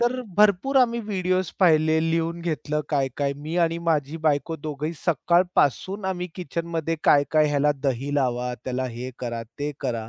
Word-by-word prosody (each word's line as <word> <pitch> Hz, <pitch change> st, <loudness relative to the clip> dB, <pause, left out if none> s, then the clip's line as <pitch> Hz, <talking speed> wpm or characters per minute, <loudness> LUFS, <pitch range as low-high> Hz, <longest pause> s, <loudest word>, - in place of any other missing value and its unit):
तर 240 Hz, +2 st, +1 dB, 0.2 s
भरपूर 210 Hz, +6 st, +3 dB
आम्ही 235 Hz, -2 st, +3 dB
व्हिडिओज 185 Hz, -4 st, -1 dB
पाहिले, 160 Hz, -3 st, +4 dB
लिहून 165 Hz, +1 st, -1 dB
घेतलं 155 Hz, -2 st, -2 dB
काय 140 Hz, -3 st, +1 dB
काय. 140 Hz, -1 st, 0 dB
मी 155 Hz, +4 st, -5 dB
आणि 165 Hz, 0 st, -1 dB
माझी 150 Hz, -1 st, 0 dB
बायको 155 Hz, +2 st, +1 dB
दोघेही 150 Hz, +1 st, -4 dB
सकाळपासून 175 Hz, -, +1 dB
आम्ही 180 Hz, -1 st, -2 dB
किचनमध्ये 165 Hz, -1 st, -3 dB
काय-काय, 150 Hz, +2 st, +4 dB
ह्याला 145 Hz, 0 st, +2 dB
दही 135 Hz, +1 st, -1 dB
लावा, 125 Hz, -3 st, 0 dB
त्याला 130 Hz, 0 st, -2 dB
हे 125 Hz, +2 st, -5 dB
करा, 120 Hz, -2 st, -4 dB, 0.2 s
ते 145 Hz, +1 st, -2 dB
करा. 115 Hz, -5 st, -3 dB
155 Hz, 155 wpm, -24 LUFS, 140-180 Hz, 0.2 s, पाहिले